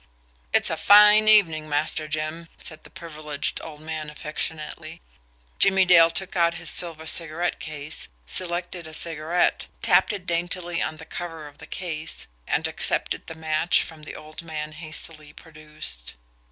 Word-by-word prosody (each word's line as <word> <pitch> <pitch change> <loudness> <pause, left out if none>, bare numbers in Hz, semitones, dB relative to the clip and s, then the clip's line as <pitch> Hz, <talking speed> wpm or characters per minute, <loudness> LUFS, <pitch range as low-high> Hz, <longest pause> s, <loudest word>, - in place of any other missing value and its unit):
"It's - - +4
a - - -2
fine 210 +1 +7
evening, 165 -8 +5
Master 155 +1 0
Jim," 155 +2 -4
said 155 -1 -5
the - - -13
privileged 150 -3 -4
old 150 -2 -9
man 155 -1 -5
affectionately. 155 +2 -5 0.6
Jimmie 190 -1 +5
Dale 170 -2 +7
took 190 +3 -3
out 170 -1 +2
his 165 0 -1
silver 165 -2 +3
cigarette 165 +2 +1
case, 155 - -5 0.2
selected 175 - -3
a 160 - -4
cigarette, 165 +1 0 0.2
tapped 190 -2 +4
it 200 -4 -6
daintily 175 0 -1
on 155 - -3
the 160 - -11
cover 165 -2 -7
of 145 - -16
the - - -11
case 160 -4 -5 0.2
and - - +1
accepted - - 0
the 165 - -7
match 160 +1 +1
the 155 -2 -10
old 155 +1 -10
man 155 -2 -6
hastily 155 -1 -5
produced. 150 - -6
160 Hz, 150 wpm, -24 LUFS, 155-175 Hz, 0.6 s, fine